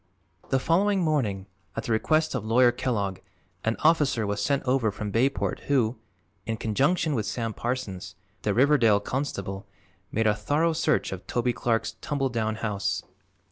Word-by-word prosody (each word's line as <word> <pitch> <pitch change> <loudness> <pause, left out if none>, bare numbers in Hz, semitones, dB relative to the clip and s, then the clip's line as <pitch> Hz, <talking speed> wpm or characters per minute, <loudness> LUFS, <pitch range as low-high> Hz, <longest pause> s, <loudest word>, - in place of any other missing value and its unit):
The 135 - +3
following 190 +8 +2
morning, 120 - 0 0.3
at 115 - -3
the 115 - -3
request 155 +8 +2
of 130 -5 -2
Lawyer 120 +3 +5
Kellogg, 105 -6 -2 0.4
an 110 +1 +1
officer 145 -8 +3
was 100 0 -1
sent 140 +4 +1
over 125 -3 +2
from 105 0 -5
Bayport 130 +6 +1
who, 125 -5 +2 0.5
in 115 -1 -1
conjunction 145 - +1
with 110 -6 -1
Sam 115 -2 -2
Parsons, 120 -7 -4 0.3
the - - 0
Riverdale 120 -5 +5
constable, 100 -6 -4 0.4
made 110 +1 0
a 105 - +4
thorough 145 +10 +1
search 155 -1 +1
of 95 -1 -7
Toby 120 0 0
Clark's 115 -1 -1
tumble 145 -4 -1
down 110 -2 -1
house. 105 -3 -2
120 Hz, 155 wpm, -26 LUFS, 110-140 Hz, 0.5 s, Lawyer